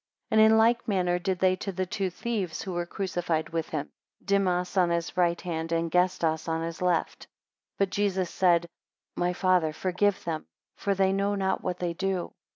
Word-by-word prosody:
3 - - +2
And 220 0 +7
in 220 - +5
like 235 +2 +3
manner 180 -4 +1
did 185 +1 -1
they 185 0 +3
to 195 - -4
the 185 0 -2
two 195 +1 -2
thieves 195 -2 -3
who 190 - -5
were 175 0 -2
crucified 175 -4 -2
with 165 -1 -3
him, 150 -2 -4 0.3
Dimas 185 -2 +1
on 180 -2 +4
his 170 0 -2
right 175 -1 +2
hand 165 -2 -4
and 165 0 0
Gestas 170 -3 +1
on 165 0 -1
his 165 +1 -5
left. 180 -2 0
4 - - -39 0.5
But 195 -1 +1
Jesus 190 -3 0
said, 175 -2 +3 0.5
My 175 0 +1
Father, 180 -4 +2
forgive 185 +4 0
them, 160 -2 -4 0.3
For 200 -1 -1
they 190 0 +2
know 200 +1 +1
not 190 -1 0
what 180 - -3
they 175 -1 -2
do. 190 0 -2
180 Hz, 195 wpm, -27 LUFS, 170-195 Hz, 0.5 s, And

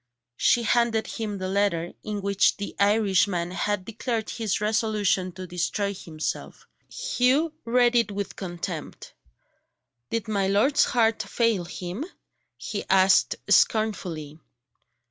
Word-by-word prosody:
She 240 - +3
handed 230 -1 +2
him 215 -3 -4
the 185 -1 -4
letter, 190 -3 0
in 210 -2 -5
which 200 0 +2
the 205 - -6
Irishman 200 -4 +2
had 195 0 -2
declared 225 0 -3
his 220 -5 -1
resolution 210 -3 +1
to 185 +1 -7
destroy 180 +3 -2
himself. 160 -4 -5 0.3
Hugh 305 - +1
read 240 +1 +3
it 235 -3 +3
with 200 -1 -4
contempt. 175 -3 -6 1.0
"Did 230 -2 -2
my 200 -3 0
lord's 210 +9 +3
heart 225 -2 +2
fail 215 -2 0
him?" 180 - -5 0.5
he 205 - -4
asked 190 0 +4
scornfully. 175 - +1
205 Hz, 120 wpm, -25 LUFS, 185-225 Hz, 1.0 s, asked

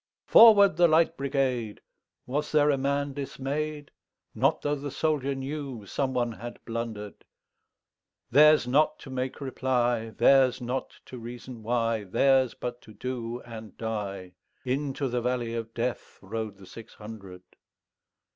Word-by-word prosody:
"Forward, 200 -6 +7
the 175 0 +6
Light 165 +1 +3
Brigade!"Was 135 +1 -3
there 150 -1 +4
a 140 - +1
man 140 +1 -1
dismay'd? 145 +2 -4 0.4
Not - - +1
tho' 145 - 0
the 145 0 -4
soldier 140 -2 -1
knewSome 135 -3 -4
one 120 -2 0
had 120 +2 -8
blunder'd:Theirs 115 +5 -1
not 150 +4 +3
to 135 - -10
make 130 0 -3
reply, 125 -4 0
Theirs 130 +3 +4
not 125 +1 -4
to 125 - -9
reason 120 0 -9
why, 115 -1 0
Theirs 130 +5 +3
but 120 0 -6
to 110 - -15
do 120 -2 -4
and 110 -3 -10
die:Into 110 +7 -4
the 125 -1 -1
valley 120 -1 -1
of 115 -1 -4
DeathRode 110 -3 -4
the 95 - -14
six 115 +4 -12
hundred. 100 -4 -10
125 Hz, 125 wpm, -27 LUFS, 115-140 Hz, 0.4 s, Forward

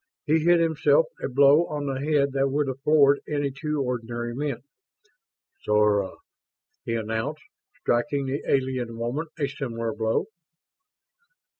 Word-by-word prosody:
He 160 +1 +3
hit 170 +2 +4
himself 165 - +3 0.2
a - - -1
blow 140 +5 +5
on 150 -1 -4
the 135 -1 -3
head 145 -1 +2
that 135 0 +1
would 145 +1 0
have 135 0 -5
floored 145 -1 +4
any 145 -2 -1
two 150 +1 -2
ordinary 120 -1 -3
men. 135 -2 -3 1.0
"Sora," 105 -2 +2 0.7
he 115 -3 -2
announced, 115 +7 -3 0.4
striking 135 +4 0
the 135 +2 -2
alien 130 -4 -1
woman 125 +8 -3
a 145 -3 0
similar 115 -5 -4
blow. 110 +1 0
135 Hz, 135 wpm, -25 LUFS, 120-150 Hz, 1.0 s, blow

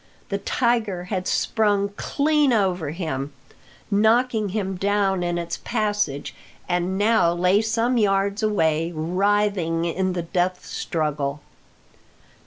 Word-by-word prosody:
The 200 - -2
tiger 220 -5 0
had 185 -1 -2
sprung 205 -2 +1
clean 295 +1 +1
over 185 -8 +1
him, 145 -4 -4 0.6
knocking 220 +1 +2
him 195 -1 -2
down 195 0 +1
in 175 0 -1
its 170 0 -3
passage, 210 - -1 0.3
and 175 +2 -1
now 210 -4 +3
lay 180 +4 +3
some 230 +2 +1
yards 200 -1 +1
away, 165 -6 +1
writhing 180 0 +1
in 185 +2 -1
the 175 -1 -2
death 180 +2 -1
struggle. 150 -3 -2
195 Hz, 115 wpm, -23 LUFS, 170-210 Hz, 0.6 s, now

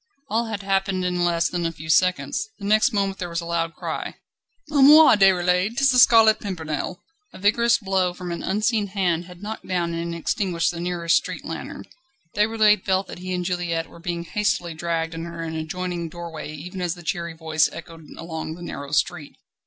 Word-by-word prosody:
All 230 +2 +1
had 210 -3 -5
happened 195 -1 0
in 180 -1 0
less 170 -1 +2
than 175 -1 -3
a 165 - 0
few 160 -1 -11
seconds. 185 +5 +1
The 200 - -8
next 215 +6 +4
moment 195 -3 -1
there 175 - -4
was 170 0 -2
a 170 - -6
loud 165 -1 -2
cry: - - -5 0.6
"A 290 -2 +3
moi, 300 0 +9
Déroulède! 190 +2 +3
'tis 275 -1 +4
the 250 - +4
Scarlet 225 -3 +7
Pimpernel!" 165 -3 -4 0.3
A - - -10
vigorous 235 +4 +3
blow 190 -3 0
from 175 0 -7
an 170 - -4
unseen 210 +2 0
hand 180 -4 0
had 180 +2 -13
knocked 220 +1 -6
down 175 -2 -1
and 170 0 -3
extinguished 170 0 0
the 170 - -7
nearest 170 -1 +1
street - - -5
lantern. - - -6 0.5
Déroulède 210 -1 +3
felt 190 0 +1
that - - -8
he 185 +1 -6
and 180 -1 -2
Juliette 175 -2 -2
were - - -13
being 170 0 -3
hastily 175 -2 -1
dragged 165 0 -2
under 170 +1 -7
an 160 -1 -4
adjoining 170 +1 -4
doorway 165 -2 -7
even 180 +5 -7
as 175 -1 -1
the 175 - -12
cheery 170 -1 -3
voice 160 -1 +1
echoed 165 -2 -11
along 160 -1 -5
the 175 - -10
narrow 140 -4 -6
street. 155 -1 -1
180 Hz, 195 wpm, -23 LUFS, 170-200 Hz, 0.6 s, moi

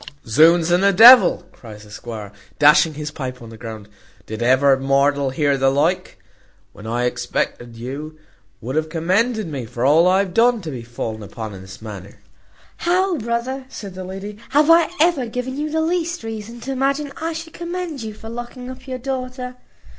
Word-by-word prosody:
"Z 115 - -4 0.2
ds 170 0 -1
and 175 +2 +3
the 200 - +5
devil!" 235 +2 +8
cries 105 -3 -12
the 105 - -16
squire, 105 -2 -8 0.3
dashing 150 +1 +5
his 150 0 -5
pipe 130 -4 -6
on 115 - -11
the 115 - -11
ground; 110 -2 -8 0.4
"did 110 +1 -6
ever 130 +3 +4
mortal 140 +1 +2
hear 140 0 0
the 135 0 +4
like? 165 +7 0 0.6
when 105 - -11
I 120 +2 -1
expected 120 -1 -2
you 140 +6 -7 0.4
would 130 +5 -5
have 155 0 0
commended 200 +8 0
me 140 -6 -5
for 120 +1 -3
all 160 +5 +5
I 185 +1 +4
have 195 -2 -1
done, 235 +2 +4
to 160 -4 -6
be 125 -3 -6
fallen 115 -2 -6
upon 105 +1 -7
in 95 - -10
this 95 +3 -12
manner!" 100 -3 -9 0.6
"How, 360 -1 +1
brother!" 235 +4 -3
said 200 -7 -8
the 185 0 -7
lady, 195 +3 -7
"have 300 +3 +4
I 335 -1 +5
ever 315 -6 +2
given 250 +3 -4
you 300 +2 -3
the 320 +1 0
least 340 -1 -1
reason 225 +1 -7
to 270 - -5
imagine 275 +2 -1
I 325 +1 -2
should 325 0 -8
commend 345 -4 -5
you 215 -1 -6
for 220 - -11
locking 240 +2 -7
up 260 +1 -12
your 260 -1 -4
daughter? 255 -1 -5
185 Hz, 190 wpm, -20 LUFS, -, 0.6 s, devil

